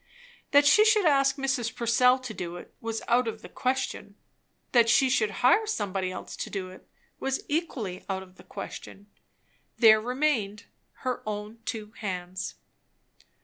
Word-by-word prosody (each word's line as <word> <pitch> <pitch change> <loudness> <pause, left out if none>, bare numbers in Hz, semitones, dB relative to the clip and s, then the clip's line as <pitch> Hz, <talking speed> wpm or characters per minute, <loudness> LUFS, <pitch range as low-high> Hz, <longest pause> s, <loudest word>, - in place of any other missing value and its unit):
That 285 +1 +5
she 420 +9 +7
should 430 -3 +4
ask 275 -3 +4
Mrs. 270 -4 -1
Purcell 250 +2 +4
to 255 -4 -7
do 175 -3 -5
it, 175 - -11
was 225 0 -4
out 245 +1 +3
of 220 0 -5
the - - -8
question. 255 -5 -2 0.6
That 235 -2 +5
she 260 +3 +4
should 215 -4 +2 0.2
hire 430 - +5
somebody 195 - -2
else - - -7
to - - -4
do 185 -2 -5
it, 185 - -15 0.3
was 270 0 -2
equally 265 - -3
out 190 0 -2
of 185 -1 -19
the - - -15
question. 200 0 -9 0.7
There 220 -2 +7
remained 245 -5 -1 0.4
her 255 -1 -1
own 210 +2 -5
two 215 -2 -5
hands. 185 -3 -4
230 Hz, 155 wpm, -27 LUFS, 200-265 Hz, 0.7 s, she